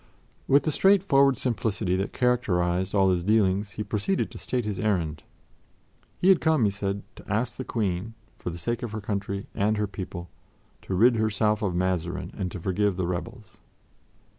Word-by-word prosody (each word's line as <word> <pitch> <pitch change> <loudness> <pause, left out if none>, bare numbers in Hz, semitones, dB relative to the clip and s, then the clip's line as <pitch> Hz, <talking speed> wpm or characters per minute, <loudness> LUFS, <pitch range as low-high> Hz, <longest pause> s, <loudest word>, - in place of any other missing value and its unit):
With 140 +2 +5
the 155 - 0
straightforward 145 -8 +4
simplicity 110 -6 -1
that 95 +1 -2
characterized 95 -6 +1
all 95 -1 +4
his 90 -2 0
dealings, 100 0 +2
he 105 - -3
proceeded 105 - -1
to - - -9
state 125 -3 -2
his 105 -3 -3
errand. 85 -8 0 1.0
He 185 - +3
had 190 - +6
come, 160 -5 +3
he 105 - +3
said, 100 0 -3
to - - -10
ask 115 +4 0
the 130 - -5
Queen, 105 -2 -2 0.2
for - - -4
the 85 - -6
sake 120 +7 -2
of 120 -3 -5
her 110 - -3
country 100 -1 -3
and 105 +2 +1
her 105 - +1
people, 95 -3 -7 0.5
to 95 - -3
rid 115 +5 +5
herself 110 0 +1
of 95 -5 -1
Mazarin 90 -2 -1
and 95 -3 -3
to 90 - -7
forgive 95 +3 0
the 95 - 0
rebels. 110 +5 -6
105 Hz, 180 wpm, -26 LUFS, 95-115 Hz, 1.0 s, had